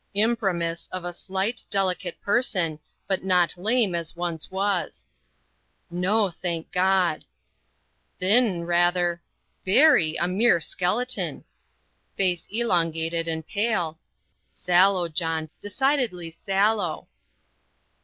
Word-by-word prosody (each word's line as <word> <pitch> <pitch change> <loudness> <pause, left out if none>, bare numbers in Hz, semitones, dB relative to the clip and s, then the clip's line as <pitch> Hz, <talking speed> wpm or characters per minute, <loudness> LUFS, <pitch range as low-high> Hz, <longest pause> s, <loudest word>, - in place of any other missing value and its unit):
"Imprimis, 195 -7 0
of 185 -1 -5
a 175 - -4
slight, 195 +6 -3
delicate 185 -3 0
person, 190 -9 +1 0.3
but 190 -2 -1
not 180 -3 +2
lame 215 +2 +1
as 170 -1 -3
once 170 -2 -3
was." 195 -1 -2 0.8
"No, 190 +3 +1
thank 170 -1 -5
God!" 185 -3 +1 0.9
"Thin, 195 -2 +2
rather 175 0 +1 0.2
" - - -46
"Very 190 - +4
a 175 - 0
mere 190 0 +3
skeleton!" 205 +10 -1 0.7
"Face 180 -3 0
elongated 165 -6 0
and 160 -1 -3
pale 195 -7 -1 0.2
" - - -47
"Sallow, 180 0 +2
John, 160 -1 -2
decidedly 215 - -1
sallow." 195 -1 0
180 Hz, 105 wpm, -25 LUFS, 170-205 Hz, 0.9 s, Very